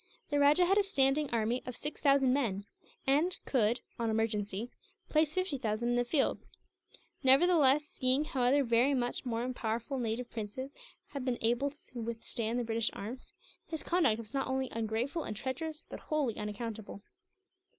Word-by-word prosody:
The 290 - +2
rajah 295 +5 +5
had 390 +3 +4
a - - +4
standing 285 -5 +2
army 230 +2 0
of 250 -2 -5
six 295 - -5
thousand 275 -3 +4
men; 210 -8 0 0.4
and 305 +7 +2
could, 235 -2 +2 0.2
on 230 - 0
an - - +1
emergency, 220 0 -1 0.4
place 305 -1 +3
fifty 370 -7 -1
thousand 225 +1 -1
in 240 - +2
the 245 - +3
field. 270 +3 +1 0.8
Nevertheless, 295 0 +5
seeing 260 0 +2
how 275 -5 -2
other 270 +4 +4
very 245 +3 +3
much 245 0 -2
more 235 0 -1
powerful 235 +3 -2
native 235 +1 -2
princes 240 +5 -5 0.4
had 280 -3 -5
been 255 -1 0
unable 240 +5 +1
to 270 -4 -10
withstand 230 0 -3
the 245 - 0
British 225 0 0
arms, 230 +6 -7 0.3
his 320 -2 -4
conduct 325 -11 +3
was 225 -1 -8
not 270 -1 -1
only 260 0 -1
ungrateful 230 +8 -2
and 210 - -5
treacherous, 305 +6 -4
but - - -8
wholly 290 -7 -1
unaccountable. 210 -1 -6
250 Hz, 170 wpm, -32 LUFS, 225-285 Hz, 0.8 s, rajah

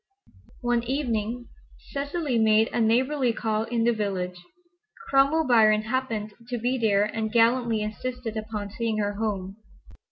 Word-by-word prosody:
One 240 -1 +1
evening 240 -3 -2 0.4
Cecily 285 -2 -1
made 220 0 +4
a 235 - +1
neighborly 250 +3 +2
call 220 -1 -1
in 230 0 -1
the 235 +1 +3
village. 180 -4 -3 0.6
Cromwell 280 +4 +3
Biron 215 -3 +4
happened 220 -3 -2
to 245 0 -3
be 250 +3 -1
there 205 -3 +3
and 220 +1 -2
gallantly 230 -1 +3
insisted 235 +2 -5
upon 215 -2 -5
seeing 225 0 -2
her 205 -1 0
home. 200 -2 -3
225 Hz, 135 wpm, -26 LUFS, 215-250 Hz, 0.6 s, made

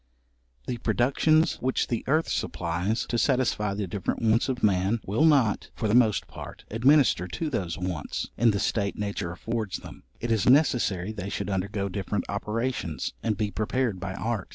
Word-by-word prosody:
The 120 - -3
productions 140 - +2
which 130 +1 +1
the 120 - -2
earth 155 +4 +2
supplies 90 +6 -1
to 120 - -1
satisfy 115 -7 +1
the 100 0 -2
different 95 +4 -3
wants 115 +3 +3
of 130 - -3
man, 100 +2 +2
will 110 +11 +2
not, 135 -9 +3
for 110 - -1
the 105 - +1
most 115 -4 +4
part, - - -10
administer 125 - +4
to 150 - -3
those 90 -9 -2
wants, 90 -5 -4
in 120 - +4
the 100 - +2
state 100 0 -1
nature 100 -4 -3
affords 110 +2 -3
them; - - -11 0.2
it 120 - -2
is 110 0 +3
necessary 120 - +3
they 100 -3 -5
should 100 0 -3
undergo 100 +1 -1
different 100 +1 -3
operations, 105 -4 -2
and 110 -3 -1
be 105 -1 -1
prepared 110 0 -1
by 95 0 -4
art. 110 -2 -3
105 Hz, 175 wpm, -27 LUFS, 100-120 Hz, 0.2 s, most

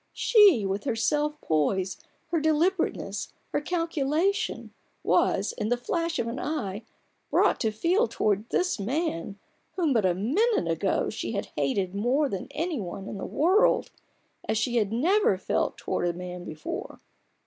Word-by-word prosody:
She, 400 - +5
with 195 +4 -2
her 250 -5 0
self 295 +6 0
poise, 180 - 0 0.3
her 335 0 +1
deliberateness, 320 +4 0 0.2
her - - -1
cal 335 +2 -1
culation, 325 +6 0 0.3
was, - - +2
in 210 - -3
the 245 - +2
flash 335 +6 -2
of - - 0
an 235 +3 -4
eye, 225 -9 -3 0.5
brought - - +3
to 220 - +1
feel 345 - +1
towards 210 +1 0
this 360 -9 0
man, 205 - -2 0.4
whom 330 -7 +1
but 225 -4 +2
a 175 - +1
moment 290 - +1
ago 165 +4 0
she 220 - -4
had 200 - -3
hated 180 +7 0
more 250 +8 +1
than 195 - -4
any 325 -2 -2
one 195 0 -6
in 200 - -6
the - - -4
world, 365 +8 +3 0.6
as 220 - +2
she 240 +2 0
had 210 -3 +1
never 325 - +3
felt 185 - -1
towards 175 -1 -2
man 180 0 -7
before. 155 -2 -6
240 Hz, 160 wpm, -27 LUFS, 195-330 Hz, 0.6 s, She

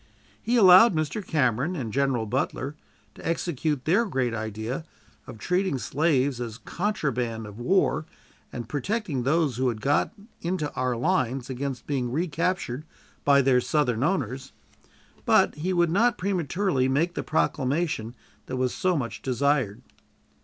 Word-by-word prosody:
He 240 - 0
allowed 190 -1 +8
Mr. 155 +7 -2
Cameron 140 +1 +1
and 120 -9 -4
General 135 -4 +1
Butler 130 +4 -2 0.4
to - - -14
execute 155 -4 -1
their 190 +9 +3
great 130 - -1
idea 110 +6 -4 0.4
of - - -9
treating 180 - 0
slaves 135 -2 +1
as 115 -2 -5
contraband 125 - -2
of 105 +1 -10
war 155 0 +1 0.4
and 120 -2 -6
protecting 150 - -2
those 140 -1 +1
who 130 0 +1
had 115 -3 -4
got 140 +5 +1 0.3
into 170 -4 -2
our 125 -1 -1
lines 130 -3 0
against 130 0 -4
being 130 -4 -2
recaptured 165 -2 -1 0.4
by 140 -1 +5
their 130 -1 +4
Southern 125 -5 0
owners; 135 - -1 0.7
but - - +4
he 165 +5 -3
would 175 -2 +2
not 230 +6 +3
prematurely 180 -6 0
make 155 +7 +1
the - - -3
proclamation 140 -5 -1 0.3
that 130 - -4
was 130 -1 0
so 185 -2 +1
much 115 -7 -4
desired. 130 -4 0
140 Hz, 140 wpm, -26 LUFS, 125-170 Hz, 0.7 s, allowed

